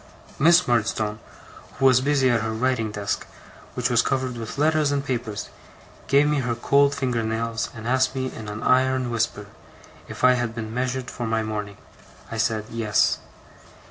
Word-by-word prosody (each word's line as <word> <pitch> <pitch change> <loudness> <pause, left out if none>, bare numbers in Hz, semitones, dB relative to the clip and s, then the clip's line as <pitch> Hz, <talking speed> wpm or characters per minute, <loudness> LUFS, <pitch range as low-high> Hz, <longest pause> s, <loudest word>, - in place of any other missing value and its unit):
Miss 170 +4 +5
Murdstone, 110 -3 0 0.6
who 135 - +1
was 130 -1 +6
busy 140 -1 +2
at 115 -2 +2
her 110 0 -2
writing 115 -1 0
desk, 105 -1 -3 0.5
which - - 0
was - - +4
covered 130 -2 -1
with 115 +1 -7
letters 155 0 +2
and 140 0 -1
papers, 120 -6 -3 0.6
gave 140 +2 +4
me 150 -1 +1
her 120 -2 -1
cold 140 +4 +3
finger 125 -4 -1
nails, 115 0 -2
and 110 0 -7
asked 130 +1 +2
me, 130 -1 -3
in 110 - -8
an 105 +1 -6
iron 130 -1 +2
whisper, 115 -3 -1 0.6
if - - -9
I 130 0 +7
had 120 -2 -2
been 110 -1 -5
measured 125 +1 -2
for 120 - -4
my 110 0 0
mourning. 105 -2 -5 0.5
I 115 - -4
said: 110 -1 0
'Yes. 110 -3 +1
120 Hz, 175 wpm, -24 LUFS, 110-130 Hz, 0.6 s, I